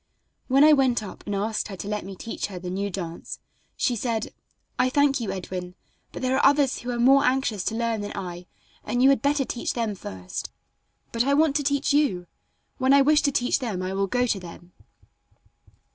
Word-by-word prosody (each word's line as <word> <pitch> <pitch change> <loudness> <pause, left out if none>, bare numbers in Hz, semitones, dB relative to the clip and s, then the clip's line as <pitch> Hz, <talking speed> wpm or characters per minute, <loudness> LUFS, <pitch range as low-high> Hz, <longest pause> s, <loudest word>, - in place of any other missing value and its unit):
When 275 +2 +5
I 305 0 +8
went 260 -5 +2
up 200 - -9
and 205 - -2
asked 215 +2 -1
her 195 -3 -8
to 200 - -6
let 210 0 -2
me 195 +1 -8
teach 225 - -5
her 195 -3 -8
the 180 0 -6
new 200 +2 -2
dance, 175 -3 -6 0.4
she 245 - +1
said: 230 -1 -2 0.5
"I 255 - +3
thank 285 0 +2
you, 230 - -3
Edwin; 180 -1 -6 0.4
but - - -7
there 255 +1 +1
are - - +1
others 280 -2 +4
who 245 - -7
are 245 - -2
more 270 +4 +5
anxious 250 -7 +1
to 225 - -1
learn 230 -2 -1
than 205 - -5
I, 180 -2 -6 0.4
and 245 +1 0
you 270 - +7
had 275 - +1
better 285 -1 +1
teach 240 - -3
them 230 -3 -1
first." 95 - -7 0.6
"But 230 0 +1
I 280 +2 +2
want 305 -1 +3
to 290 - -2
teach 280 0 +1
you. 275 -12 +1 0.5
When 260 +1 +4
I 280 0 +6
wish 300 +1 +4
to 285 - +1
teach 250 0 +1
them 215 -8 -3
I 185 +1 -3
will 195 0 0
go 245 +5 +1
to 220 -5 0
them." 175 0 -12
235 Hz, 215 wpm, -25 LUFS, 195-270 Hz, 0.6 s, I